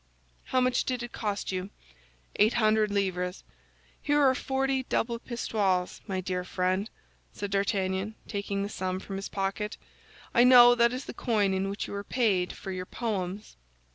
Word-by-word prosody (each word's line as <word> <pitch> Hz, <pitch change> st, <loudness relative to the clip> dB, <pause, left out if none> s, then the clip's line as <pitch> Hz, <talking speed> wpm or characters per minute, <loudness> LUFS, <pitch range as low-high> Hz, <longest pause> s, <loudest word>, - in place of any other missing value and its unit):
"How 255 Hz, -, +1 dB
much 255 Hz, 0 st, +2 dB
did 250 Hz, -2 st, -2 dB
it 240 Hz, -, -7 dB
cost 205 Hz, -3 st, -3 dB
you?" 185 Hz, +1 st, -3 dB, 0.7 s
"Eight 215 Hz, +3 st, +4 dB
hundred 215 Hz, -2 st, +3 dB
livres." 185 Hz, -2 st, -1 dB, 0.6 s
"Here 290 Hz, 0 st, +2 dB
are 270 Hz, -2 st, +5 dB
forty 270 Hz, 0 st, 0 dB
double 235 Hz, -2 st, -1 dB
pistoles, 200 Hz, -7 st, -1 dB
my 190 Hz, -1 st, -2 dB
dear 180 Hz, 0 st, -2 dB
friend," 185 Hz, +3 st, -1 dB, 0.4 s
said 205 Hz, -1 st, -5 dB
D'Artagnan, 195 Hz, +1 st, 0 dB
taking 200 Hz, -1 st, -2 dB
the 200 Hz, -, -3 dB
sum 185 Hz, -2 st, -3 dB
from 195 Hz, 0 st, -6 dB
his 195 Hz, -, -5 dB
pocket; 195 Hz, +2 st, -3 dB, 0.6 s
"I 240 Hz, -, +6 dB
know 245 Hz, -1 st, +9 dB
that 235 Hz, -1 st, +4 dB
is 255 Hz, +2 st, -5 dB
the -, -, -7 dB
coin 210 Hz, -5 st, +1 dB
in 190 Hz, +1 st, -1 dB
which 200 Hz, -, -3 dB
you -, -, -7 dB
were 200 Hz, 0 st, -4 dB
paid 200 Hz, -6 st, +1 dB
for 190 Hz, -, -7 dB
your 185 Hz, -1 st, -5 dB
poems." 205 Hz, -3 st, -4 dB
205 Hz, 170 wpm, -28 LUFS, 190-235 Hz, 0.7 s, know